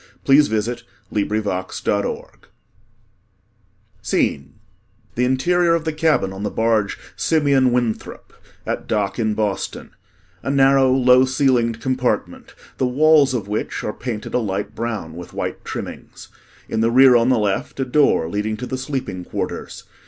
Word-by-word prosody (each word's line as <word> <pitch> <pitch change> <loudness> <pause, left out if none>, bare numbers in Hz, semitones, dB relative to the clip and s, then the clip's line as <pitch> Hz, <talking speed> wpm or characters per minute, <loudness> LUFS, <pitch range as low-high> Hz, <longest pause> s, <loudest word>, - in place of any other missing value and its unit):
[The 135 - +4
Curtain 110 -4 -1
Falls] - - -14
ACT 95 -1 -4
III 100 0 0 1.8
SCENE 70 0 -1 0.6
The 125 - +1
interior 170 +7 +2
of 165 -1 -3
the 160 - -1
cabin 155 - +1
on 95 - -8
the 105 - -1
barge, 110 -2 0 0.2
"Simeon 140 -5 +2
Winthrop" 120 -3 -3 0.3
(at - - -4
dock 100 -2 -1
in 110 -2 0
Boston) 105 -2 -3 0.5
a - - -4
narrow, 135 -1 +4
low 130 0 +5
ceilinged 130 -4 +1
compartment 130 -1 -2 0.2
the 130 - +2
walls 145 0 +4
of 105 -5 -3
which 105 +1 -3
are 105 - -3
painted 120 -4 -6
a - - +2
light 100 -1 -3
brown 110 -8 -4
with 90 0 -10
white - - -4
trimmings. - - -8 0.4
In 110 - -1
the 115 - +3
rear 130 +1 +6
on 120 +1 +4
the 130 - +3
left, 105 +3 -2
a 135 - 0
door 135 - +2
leading 105 +4 -2
to 125 - -5
the 130 0 -4
sleeping 130 -9 -4
quarters. - - -5
120 Hz, 150 wpm, -20 LUFS, 105-135 Hz, 1.8 s, rear